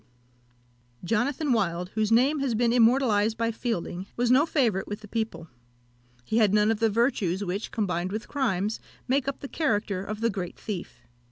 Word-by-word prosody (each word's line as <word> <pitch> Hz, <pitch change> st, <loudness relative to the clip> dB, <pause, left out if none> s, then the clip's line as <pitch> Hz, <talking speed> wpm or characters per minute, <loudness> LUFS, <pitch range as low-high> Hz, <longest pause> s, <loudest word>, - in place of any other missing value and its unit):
Jonathan 255 Hz, -, 0 dB
Wild, 180 Hz, -5 st, 0 dB
whose 215 Hz, +1 st, -1 dB
name 265 Hz, +6 st, +4 dB
has 270 Hz, -4 st, 0 dB
been 235 Hz, +1 st, +2 dB
immortalised 225 Hz, -3 st, +3 dB
by 230 Hz, 0 st, 0 dB
Fielding, 210 Hz, -5 st, -3 dB
was 240 Hz, 0 st, +2 dB
no 280 Hz, +5 st, +5 dB
favourite 230 Hz, -, +1 dB
with 205 Hz, +1 st, -6 dB
the 210 Hz, -, -11 dB
people. 220 Hz, -5 st, -3 dB, 0.8 s
He 220 Hz, -, +1 dB
had 210 Hz, -2 st, +4 dB
none 210 Hz, +1 st, +4 dB
of 220 Hz, -, -1 dB
the 225 Hz, 0 st, +3 dB
virtues 205 Hz, -4 st, 0 dB
which, 195 Hz, +4 st, -3 dB
combined 185 Hz, -4 st, -2 dB
with 215 Hz, +2 st, -4 dB
crimes, 215 Hz, -6 st, -1 dB, 0.3 s
make 270 Hz, +1 st, +1 dB
up 275 Hz, -, -3 dB
the 275 Hz, -, -5 dB
character 210 Hz, -, -1 dB
of 215 Hz, +2 st, -6 dB
the 230 Hz, 0 st, +2 dB
great 185 Hz, -3 st, -5 dB
thief. 180 Hz, -, -6 dB
220 Hz, 175 wpm, -27 LUFS, 200-245 Hz, 0.8 s, no